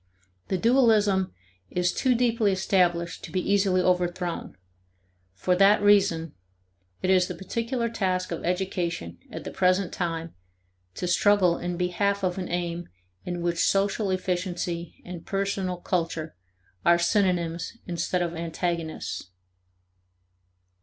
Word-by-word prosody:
The 190 - 0
dualism 215 -4 +3 0.4
is 180 0 0
too 255 -2 +2
deeply 230 -3 +2
established 175 -3 +1
to - - -8
be 185 - 0
easily 195 -1 +2
overthrown; 180 - -1 0.8
for 180 - +1
that 200 +3 +6
reason, 195 -6 +3 0.7
it 185 - +3
is 180 -1 +4
the - - -5
particular 230 +4 -2
task 185 -5 -1
of 170 - -4
education 175 - -2
at - - -7
the - - -6
present 185 +1 +2
time 165 -2 -3 0.6
to - - -3
struggle 185 -1 +3
in 175 0 -3
behalf 195 +3 0
of 185 0 0
an 180 - -4
aim 175 0 -3 0.4
in 175 -1 -3
which 170 -1 0
social 200 +1 +1
efficiency 180 -2 -3
and 175 -2 -8
personal 195 -2 -1
culture 165 -3 -2 0.5
are 170 - +5
synonyms 175 0 0
instead 175 +1 -1
of 170 -1 -3
antagonists. 165 - -3
180 Hz, 125 wpm, -26 LUFS, 170-195 Hz, 0.8 s, that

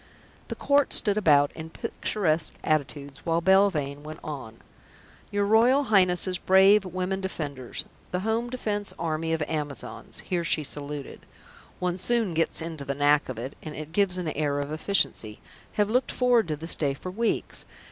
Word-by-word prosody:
The - - -5
Court 285 0 +2
stood 205 -2 +3
about 145 -8 +4
in 160 0 -8
picturesque 165 -2 -2
attitudes 145 -1 -2
while 165 0 +1
Belvane 170 -7 +2
went 155 +1 -8
on: 130 -8 -7 0.7
"Your 205 0 0
Royal 235 +7 +4
Highness's 185 -1 +4
brave 195 +2 +5
Women 185 +1 -3
Defenders, 145 -9 -4 0.2
the 180 - -2
Home 225 +3 -1
Defence 210 -5 -3
Army 160 0 -2
of 160 -1 0
Amazons" 145 -5 -4
(here 175 -2 -2
she 160 -2 +1
saluted; 145 0 -7 0.5
one 180 0 -2
soon 230 -3 +1
gets 165 0 0
into 160 -3 -5
the 140 0 -3
knack 145 0 +3
of 130 - -5
it, 130 +4 -6
and 155 -1 -7
it 155 0 -7
gives 185 0 +2
an 175 -3 -2
air 145 -1 -1
of 145 +1 -4
efficiency) 155 - 0 0.3
"have 210 -1 +2
looked 250 +3 +1
forward 245 -5 +3
to 155 - -1
this 160 +3 0
day 140 -3 0
for 185 +6 -7
weeks. 230 +4 -1
165 Hz, 165 wpm, -26 LUFS, 145-200 Hz, 0.7 s, brave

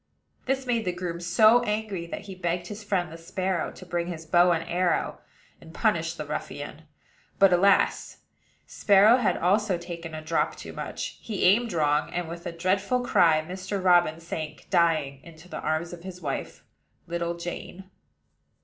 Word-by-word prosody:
This 265 0 0
made 235 -2 0
the 180 - +1
groom 175 -1 -5
so 215 +7 +5
angry 210 -6 -3
that - - -6
he 200 -2 -9
begged 175 -1 -2
his 210 +1 -7
friend, 185 -5 -1
the 165 - -9
sparrow, 185 +1 -2
to 185 - -12
bring 175 -1 -2
his 165 -2 -6
bow 175 +2 +4
and 165 -1 -1
arrow, 175 0 0 0.4
and 160 - -14
punish 170 -7 +1
the 150 - -6
ruffian. 150 +1 -6 0.5
But, 195 -2 +6
alas! 195 +3 +3 0.5
Sparrow 205 +4 +5
had 245 - +1
also 195 +1 +2
taken 170 -2 -7
a 155 - -7
drop 165 +1 0
too - - -9
much: - - -6
he 210 -4 -3
aimed 220 +5 +4
wrong, 150 -2 +1
and, 175 -1 -2
with 170 +1 -7
a - - -3
dreadful 190 +8 0
cry, 160 -7 +4
Mr. 185 +2 -4
Robin 175 -3 +4
sank 155 -4 -6
dying 155 -6 +2
into 165 +2 -14
the - - -6
arms 155 +3 -2
of 175 - -9
his 180 0 -8
wife, 145 -5 -5 0.4
little 170 0 -3
Jane. 175 +2 -7
175 Hz, 170 wpm, -26 LUFS, 165-195 Hz, 0.5 s, But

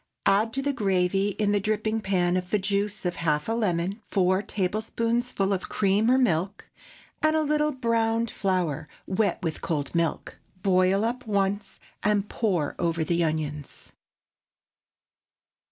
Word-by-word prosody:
Add 205 +3 +3
to 270 - -2
the 285 0 0
gravy 195 -3 +1
in 205 -1 +1
the 205 - +2
dripping 215 +2 -1
pan 180 -3 +1 0.2
the 210 - +2
juice 200 +1 -1
of 180 0 -1
half 150 -2 0
a - - -1
lemon, 200 -2 -1
four 185 0 +2
tablespoonfuls 215 +2 -1
of 190 -2 -2
cream 205 +2 +2
or 255 - +5
milk, 195 -6 0 0.5
and 310 0 +3
a 315 - +2
little 300 0 +1
browned 230 -3 0
flour 175 -6 -1 0.2
wet 200 +2 +1
with 160 -2 -3
cold 145 -4 -2
milk. 170 -2 -1 0.2
Boil 190 +2 +3
up 245 +1 -3
once, 200 0 -1 0.2
and 205 -1 +1
pour 185 -12 -1
over 170 -2 0
the 170 +2 +1
onions. 150 -2 -4
200 Hz, 140 wpm, -26 LUFS, 180-225 Hz, 0.5 s, or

